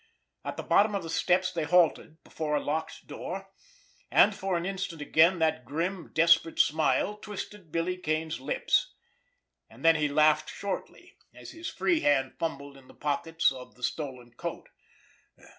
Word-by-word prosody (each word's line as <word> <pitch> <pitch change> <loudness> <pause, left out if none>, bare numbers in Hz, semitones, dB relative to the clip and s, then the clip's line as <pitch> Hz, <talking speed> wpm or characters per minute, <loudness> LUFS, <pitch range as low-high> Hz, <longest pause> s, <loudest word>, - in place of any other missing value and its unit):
At - - -5
the - - -4
bottom 210 0 +3
of 195 - -2
the 165 - -6
steps 185 +2 +2
they 170 -3 -2
halted—before 160 -2 +1
a - - +2
locked 160 +2 -4
door—and 195 - -1
for 190 -3 -2
an 170 - -3
instant 190 -3 -4
again 160 +4 +4
that 160 -6 +1
grim, 170 - -3
desperate 165 0 +4
smile 155 +6 +2
twisted 210 -4 -8
Billy 170 +3 -1
Kane's 155 -2 -2
lips. 135 - 0 0.7
And 120 +7 -12
then 165 0 +6
he 150 0 +1
laughed 155 +1 +3
shortly, 200 -1 -6 0.2
as - - -10
his 335 +1 -6
free 345 -3 +1
hand 135 - +2
fumbled 140 -4 -4
in 130 -1 -18
the - - -17
pockets 165 +2 0
of 125 -1 -10
the 125 - -16
stolen 125 -4 -4
coat. - - -6
165 Hz, 155 wpm, -28 LUFS, 150-185 Hz, 0.7 s, then